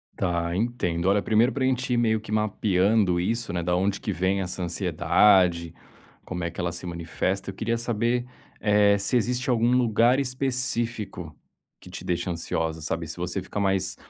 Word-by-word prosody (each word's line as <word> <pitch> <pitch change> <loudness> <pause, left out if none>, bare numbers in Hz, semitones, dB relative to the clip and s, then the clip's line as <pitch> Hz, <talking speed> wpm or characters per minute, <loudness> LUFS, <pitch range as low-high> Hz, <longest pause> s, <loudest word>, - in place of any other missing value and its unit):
Tá, 85 -2 -1
entendo. 95 -6 -1
Olha 100 +1 +3
1º 110 +3 +3
para 135 - -2
gente 130 -1 0
ir - - +2
meio 110 -2 +2
que 110 0 -10
mapeando 105 -2 +2
isso 115 +4 -1
né, 85 - -1
da 90 +1 0
onde 95 +2 0
que - - -3
vem 95 +3 0
essa 90 0 -4
ansiedade, 85 0 +3 0.5
como 90 -1 -5
é 85 - -1
que 85 - -11
ela 85 -1 -1
se 85 +1 -7
manifesta, 90 +3 -3
eu - - -15
queria 115 +3 -1
saber, 120 +1 0 0.3
eh, 105 -1 +4
se 100 +5 -1
existe 125 +2 0
algum 120 0 +3
lugar 120 +1 +3
específico 120 - -2 0.4
que - - -14
te - - -8
deixa 90 +1 -2
ansiosa, 80 -1 -3
sabe, 80 +1 -3
se - - -7
você 90 +2 -3
fica 100 - -5
mais 95 -2 0
100 Hz, 180 wpm, -25 LUFS, 90-115 Hz, 0.5 s, eh